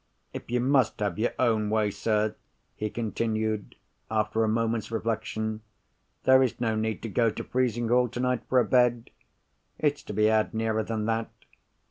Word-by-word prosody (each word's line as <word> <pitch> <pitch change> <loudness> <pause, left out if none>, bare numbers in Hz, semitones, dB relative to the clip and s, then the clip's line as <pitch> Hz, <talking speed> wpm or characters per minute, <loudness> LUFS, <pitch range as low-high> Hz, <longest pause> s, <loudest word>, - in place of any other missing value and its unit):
If - - -8
you 125 +1 +1
must 130 -3 +2
have 100 -2 -2
your 115 - +1
own 110 -4 +2
way, 105 -1 +1
sir," 105 0 0 0.4
he 105 - -3
continued, 110 -1 -2 0.3
after 110 0 +1
a - - +1
moment's 115 0 0
reflection, 110 -1 -2 0.6
"there 130 0 +6
is 130 -3 0
no 115 -2 0
need 110 0 -2
to - - -3
go 115 +2 +2
to - - -5
Frizinghall 125 0 +1
tonight 125 +1 -1
for 130 - +4
a 120 - +3
bed. 125 -2 +2 0.7
It's 145 -1 0
to - - -8
be 105 +1 +2
had 110 +1 +2
nearer 110 0 0
than 110 0 -3
that. 115 0 -1
110 Hz, 165 wpm, -27 LUFS, 110-120 Hz, 0.7 s, there